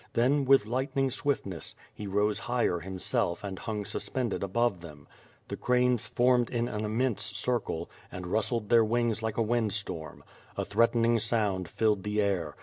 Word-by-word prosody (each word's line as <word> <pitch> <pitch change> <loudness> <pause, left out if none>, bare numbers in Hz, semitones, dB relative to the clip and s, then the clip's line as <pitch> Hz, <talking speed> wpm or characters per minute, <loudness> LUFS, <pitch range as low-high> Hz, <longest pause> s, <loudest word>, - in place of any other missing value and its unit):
Then, 135 +4 +3
with 135 -4 +5
lightning 130 +3 0
swiftness, 120 - -2 0.2
he 105 - -7
rose 105 +2 +1
higher 120 -8 0
himself 90 0 -1
and 95 -2 -5
hung 105 -2 -4
suspended 125 0 -2
above 100 -1 0
them. 75 -4 -12 0.4
The - - -5
cranes 125 -1 +2
formed 125 -1 +3
in 120 -1 -1
an 105 -2 -3
immense 115 +2 0
circle, 100 -3 -2 0.2
and 90 -1 -6
rustled 110 +3 -1
their 115 -1 +6
wings 115 0 0
like 110 -1 -3
a 115 - +3
wind 110 -2 0
storm. 80 -7 -4 0.3
A - - -1
threatening 115 +2 +3
sound 105 -6 0
filled 105 -3 +1
the 105 +2 -2
air. 95 -7 0
110 Hz, 160 wpm, -29 LUFS, 100-120 Hz, 0.4 s, their